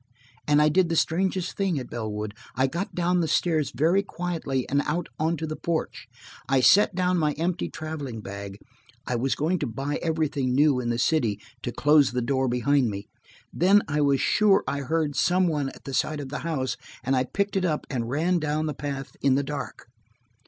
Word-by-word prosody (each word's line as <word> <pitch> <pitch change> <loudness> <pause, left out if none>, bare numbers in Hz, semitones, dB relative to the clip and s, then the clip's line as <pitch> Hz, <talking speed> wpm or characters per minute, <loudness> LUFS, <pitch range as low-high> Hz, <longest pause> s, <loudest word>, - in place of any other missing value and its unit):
And 150 0 +5
I - - +5
did 175 +2 +3
the 165 - 0
strangest 185 +2 0
thing 195 -5 0
at 130 - -6
Bellwood. 105 -2 -4 0.2
I 130 - +3
got 170 +9 -3
down 180 0 +1
the 165 - 0
stairs 155 -1 +1
very 170 +7 +2
quietly 170 -9 -3
and 140 +1 +2
out 170 +3 -1
on 160 +2 +1
to 160 - -3
the 155 0 -4
porch. 165 0 -3 0.4
I 135 -1 +4
set 200 +8 +5
down 180 -1 +1
my 150 -2 +1
empty 170 +4 -2
traveling 150 -7 -6
bag–I 115 +5 -8
was 130 +3 0
going 165 +5 0
to 145 - -2
buy 135 +6 -3
everything 155 -6 0
new 145 -2 +4
in 120 -1 -2
the 120 - 0
city–to 120 -3 -1
close 145 -3 +4
the 125 -1 0
door 130 +2 +1
behind 125 +1 +2
me. 100 0 -6 0.4
Then 195 +4 +4
I 150 0 0
was 140 -2 +3
sure 210 -2 +3
I 140 - -1
heard 150 +1 -1
some 180 +6 +3
one 145 -4 -1
at - - -14
the 135 - -7
side 155 +3 0
of 140 -2 -6
the 145 - -4
house, 145 -6 -2 0.3
and 135 +2 +1
I 130 - +2
picked 200 +9 -2
it 190 - +1
up 155 -4 -1
and 120 -4 -3
ran 170 +6 +1
down 155 0 -1
the 150 - -2
path 140 -1 -5
in 135 -2 +3
the 140 - +1
dark. 145 0 -6
150 Hz, 200 wpm, -26 LUFS, 130-165 Hz, 0.4 s, And